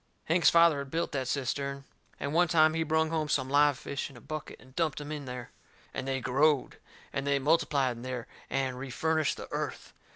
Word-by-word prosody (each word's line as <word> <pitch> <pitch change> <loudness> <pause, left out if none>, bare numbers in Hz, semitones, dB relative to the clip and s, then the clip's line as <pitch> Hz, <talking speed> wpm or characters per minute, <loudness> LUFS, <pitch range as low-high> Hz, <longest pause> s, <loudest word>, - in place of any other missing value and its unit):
Hank's 170 +2 +5
father 170 -3 +5
had 140 -1 -6
built 165 +4 -1
that 130 -3 -2
cistern. 140 +1 -2 0.4
And 140 +2 -3
one 175 +2 +4
time 155 -1 +5
he 165 - 0
brung 160 0 +1
home 155 -2 -1
some 130 -2 0
live 145 -1 +5
fish 140 +2 -4
in 135 - -14
a - - -11
bucket 155 +4 -7
and 130 +1 -18
dumped 160 -4 0
em 145 0 -7
in 150 -2 -5
there. 125 -1 -7 0.4
And 130 - -4
they 135 0 0
growed. 135 +3 +2 0.4
And 135 +1 -2
they 140 0 +3
multiplied 140 -4 +2
in - - -9
there 125 -1 -4 0.2
and 130 -2 -1
refurnished 155 +3 0
the - - -7
earth. - - -4
140 Hz, 205 wpm, -30 LUFS, 130-155 Hz, 0.4 s, Hank's